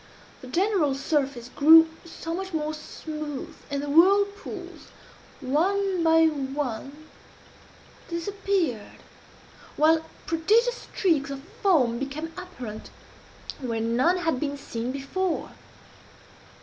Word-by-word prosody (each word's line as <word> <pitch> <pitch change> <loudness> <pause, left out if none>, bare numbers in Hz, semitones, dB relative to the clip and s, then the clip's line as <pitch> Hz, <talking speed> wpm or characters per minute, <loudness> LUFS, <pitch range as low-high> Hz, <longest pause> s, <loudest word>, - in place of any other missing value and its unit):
The 255 - -10
general 350 -2 +1
surface 275 -4 -1
grew 320 +5 +7 0.2
somewhat 340 +2 -5
more 305 0 -1
smooth, 305 -1 -7
and 280 0 -2
the - - -4
whirlpools, 400 +7 +2 0.5
one 370 +7 +1
by 325 0 +5
one, 280 0 -3 1.0
disappeared, 340 - -2 0.8
while 320 +2 +4 0.2
prodigious 440 +10 +1
streaks 310 -8 +1
of 275 -1 -6 0.2
foam 260 -12 +3
became 300 +4 -5
apparent 255 - -8 0.7
where 235 -4 -3
none 245 +11 +2
had 325 -7 0
been 285 0 -2
seen 235 -3 -4
before. 315 +7 -2
310 Hz, 95 wpm, -26 LUFS, 275-355 Hz, 1.0 s, grew